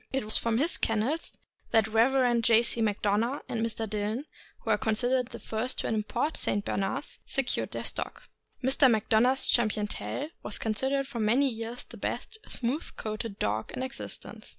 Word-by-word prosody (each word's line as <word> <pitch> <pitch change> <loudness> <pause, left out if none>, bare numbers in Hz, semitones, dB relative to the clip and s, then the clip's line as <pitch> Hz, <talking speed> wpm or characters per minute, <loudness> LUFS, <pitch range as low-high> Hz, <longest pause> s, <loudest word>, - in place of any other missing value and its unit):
It 270 -3 -1
was 215 - +4
from 230 -1 +2
his 310 +7 +2
kennels 230 +9 -1 0.3
that 225 -2 +4
the 220 - -7
Rev. 240 +1 +4
J. 230 0 +5
C. 235 - +2
Macdona 215 +4 +1
and 225 -1 -1
Mr. 225 -1 -1
Dillon 215 +6 -2 0.4
(who - - -1
are - - +4
considered 245 +3 +1
the 235 - -8
first 225 +4 -2
to - - -2
import 225 +7 -1
St. 205 0 0
Bernards) 260 +9 -2
secured 270 -3 0
their - - -4
stock. - - -4 0.4
Mr. 265 +1 +5
Macdona' 220 +2 +4
s 265 - -1
Champion 215 -3 +2
Tell 280 +7 -3
was 210 - -1
considered 265 +5 0
for 255 -4 -5
many 235 +6 +3
years 230 0 -4
the - - -12
best 440 - -4
smooth 255 +7 -3
coated 215 -1 -4
dog 105 +2 -1
in 255 - -3
existence. 260 +1 -6
230 Hz, 175 wpm, -29 LUFS, 215-260 Hz, 0.4 s, J